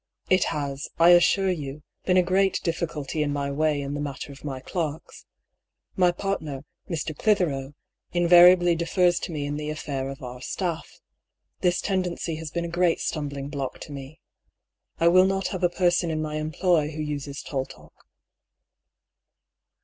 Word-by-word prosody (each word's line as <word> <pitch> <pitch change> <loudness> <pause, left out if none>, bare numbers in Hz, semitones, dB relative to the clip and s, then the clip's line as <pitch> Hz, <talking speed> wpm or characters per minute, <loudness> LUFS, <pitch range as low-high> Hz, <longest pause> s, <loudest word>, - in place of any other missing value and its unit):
" - - -34
It 185 - +1
has, 140 -2 -3
I 170 +1 +7
a'ssure 185 +2 +5
you, 145 -1 -7 0.2
been 185 -1 +3
a 180 - +5
great 190 +2 +2
difficulty 165 -3 -2
in 145 -1 0
my 140 -1 -2
way 150 +1 +1
in 140 0 -4
the 145 - -3
mat 145 -2 -5
ter 140 - -6
oi - - -13
my 135 -3 -4
clerks. 155 +2 -5 0.7
My 180 -1 +4
partner, 160 -7 -4 0.2
Mr. 155 -2 -3
Clithero, 145 -9 0 0.4
invariably 175 0 +6
defers 175 +1 +2
to - - -5
me 150 -3 -3
in 145 +1 -3
the 150 0 -4
affair 140 -3 -3
of 135 +1 -8
our 125 0 -7
staff. 170 +2 -3 0.7
This 180 -1 +1
tendency 180 -4 -2
has 160 -1 -6
been 170 +2 -3
a 170 0 -6
great 175 -2 +3
stumbling 140 -2 -3
block 140 -3 -4
to - - -8
me. 140 +2 -9 0.8
I 165 - +4
will 185 +2 +6
not 195 0 -1
have 185 - -4
a 175 - +5
person 175 -1 +1
in 155 -1 -1
my 155 -1 -3
employ 155 0 +1
who 155 0 -5
uses 145 -1 -5
tall 135 -2 -3
talk." - - -15
155 Hz, 170 wpm, -25 LUFS, 145-175 Hz, 0.8 s, I